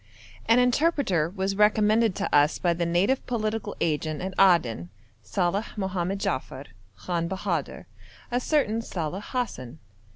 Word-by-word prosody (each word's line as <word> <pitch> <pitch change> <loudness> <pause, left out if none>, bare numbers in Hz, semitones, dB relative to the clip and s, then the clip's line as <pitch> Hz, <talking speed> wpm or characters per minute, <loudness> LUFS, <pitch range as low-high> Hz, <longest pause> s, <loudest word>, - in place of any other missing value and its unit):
As 230 - +6
interpreter 250 - +2
was 195 +1 -2
recommended 210 +1 +3
to - - -1
us 145 +1 +4
by 175 -1 +1
the 170 0 -2
native 190 +10 +1
political 215 -3 -2
agent 155 -1 -1
at 190 +1 -4
Aden, 125 - +3 0.3
Saleh 175 - -2
Mohammed 190 -1 -2
Jaffer, 130 -5 -3 0.3
Khan 170 - -2
Bahadur 190 +1 -3 0.5
a 245 - +1
certain 250 -5 +1
Saleh 180 -2 -4
Hassan. 225 - -4
190 Hz, 130 wpm, -26 LUFS, 170-220 Hz, 0.5 s, As